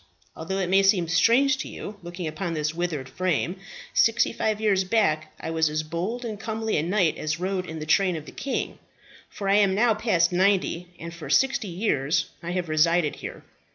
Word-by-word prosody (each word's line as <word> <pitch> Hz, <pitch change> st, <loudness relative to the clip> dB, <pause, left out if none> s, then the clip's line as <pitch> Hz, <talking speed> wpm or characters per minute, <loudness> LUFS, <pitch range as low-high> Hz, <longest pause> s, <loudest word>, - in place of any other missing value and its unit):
Although 170 Hz, +4 st, -4 dB
it 185 Hz, -2 st, -1 dB
may 195 Hz, +1 st, +6 dB
seem 195 Hz, -3 st, +3 dB
strange 235 Hz, +11 st, +4 dB
to -, -, -5 dB
you, 205 Hz, -, -8 dB
looking 175 Hz, 0 st, -6 dB
upon 165 Hz, +2 st, -3 dB
this 155 Hz, 0 st, -1 dB
withered 165 Hz, -6 st, -3 dB
frame, 180 Hz, +1 st, -1 dB, 0.4 s
sixty 230 Hz, 0 st, +3 dB
five 215 Hz, -2 st, -1 dB
years 205 Hz, -3 st, +2 dB
back 185 Hz, -6 st, +1 dB
I -, -, -4 dB
was 160 Hz, -1 st, +2 dB
as 155 Hz, +1 st, -2 dB
bold 180 Hz, +10 st, -4 dB
and 215 Hz, -3 st, -5 dB
comely 220 Hz, 0 st, -2 dB
a -, -, +2 dB
knight 175 Hz, 0 st, +1 dB
as 155 Hz, +1 st, -2 dB
rode 185 Hz, 0 st, -2 dB
in 160 Hz, -, -6 dB
the 155 Hz, -, -5 dB
train 180 Hz, +3 st, +3 dB
of 155 Hz, -2 st, -6 dB
the -, -, -10 dB
king, 275 Hz, -, -3 dB, 0.5 s
for 200 Hz, -, -6 dB
I 200 Hz, +1 st, +4 dB
am 200 Hz, -2 st, +3 dB
now 225 Hz, +2 st, +4 dB
past 205 Hz, -6 st, +2 dB
ninety, 185 Hz, -1 st, +1 dB
and 170 Hz, 0 st, -8 dB
for 170 Hz, -2 st, -9 dB
sixty 270 Hz, -4 st, +2 dB
years 160 Hz, -5 st, 0 dB
I 170 Hz, -, -6 dB
have 180 Hz, -1 st, -2 dB
resided 155 Hz, 0 st, +2 dB
here. -, -, -8 dB
180 Hz, 200 wpm, -25 LUFS, 160-210 Hz, 0.5 s, may